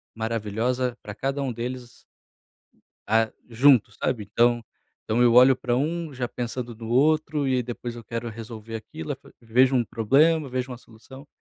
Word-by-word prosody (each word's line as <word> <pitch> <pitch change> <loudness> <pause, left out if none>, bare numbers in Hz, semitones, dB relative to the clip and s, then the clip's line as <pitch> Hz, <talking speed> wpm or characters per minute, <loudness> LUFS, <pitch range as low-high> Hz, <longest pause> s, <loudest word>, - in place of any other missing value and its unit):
maravilhosa 115 +3 -1
pra 105 - -8
cada 135 +4 -2
um 135 -2 -1
deles. 120 +1 -7 1.0
Ah, 110 +1 +2 0.2
junto, 125 0 +5
sabe, 120 -5 -2
então 120 0 +3 0.4
então 115 +3 0
eu 120 -1 +5
olho 130 +2 +7
para 125 -1 -2 0.4
já 125 -1 -3
pensando 120 0 -5
no 115 0 -9
outro 145 +3 +2
e 130 -1 +2
depois 120 0 -6
eu 120 - -9
quero 115 +1 -5
resolver 115 0 -8
aquilo, 95 -8 -6 0.2
vejo 125 +3 +3
um 125 - +3
problema 140 +8 +2
vejo 130 0 -3
uma 125 - -6
solução 125 +4 -15
120 Hz, 155 wpm, -25 LUFS, 115-130 Hz, 1.0 s, olho